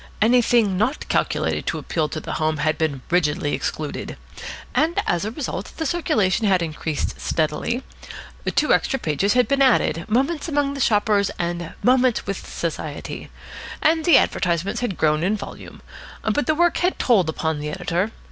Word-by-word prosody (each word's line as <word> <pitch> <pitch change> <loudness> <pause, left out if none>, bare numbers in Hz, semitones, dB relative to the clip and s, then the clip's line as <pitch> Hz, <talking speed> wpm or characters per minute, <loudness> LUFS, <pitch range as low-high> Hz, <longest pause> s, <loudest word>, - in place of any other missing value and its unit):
Anything 230 -3 +3
not 250 +8 0
calculated - - 0
to - - -1
appeal 155 -3 -2
to 155 - -4
the - - -6
home 155 0 +1
had 155 +1 +1
been 145 -5 -2
rigidly 155 -3 +1
excluded. - - -4 0.6
And 325 +2 +2
as 175 +2 0
a - - -1
result 230 -5 -5
the 320 - -2
circulation 220 - +1
had 185 -3 +3
increased 155 -1 -3
steadily. 160 - -1 0.7
Two - - +3
extra 270 - +1
pages 190 - 0
had 250 0 +3
been 275 0 +1
added, 250 -10 +3
"Moments 280 +8 0
Among 290 -2 0
the 280 - -6
Shoppers" 205 -4 +2
and 175 -1 -3
"Moments 255 -1 +3
with 195 -1 -5
Society." - - -5 0.5
And 320 0 +2
the 345 - +7
advertisements 180 +4 0
had 220 -8 -2
grown 155 0 +2
in 200 +5 +1
volume. - - -10 0.4
But 220 +7 0
the 310 - +3
work 345 +1 +3
had 360 +1 +1
told 200 -10 +3
upon 160 -1 -2
the 150 0 -4
Editor. 175 +4 -1
200 Hz, 165 wpm, -22 LUFS, 165-260 Hz, 0.7 s, the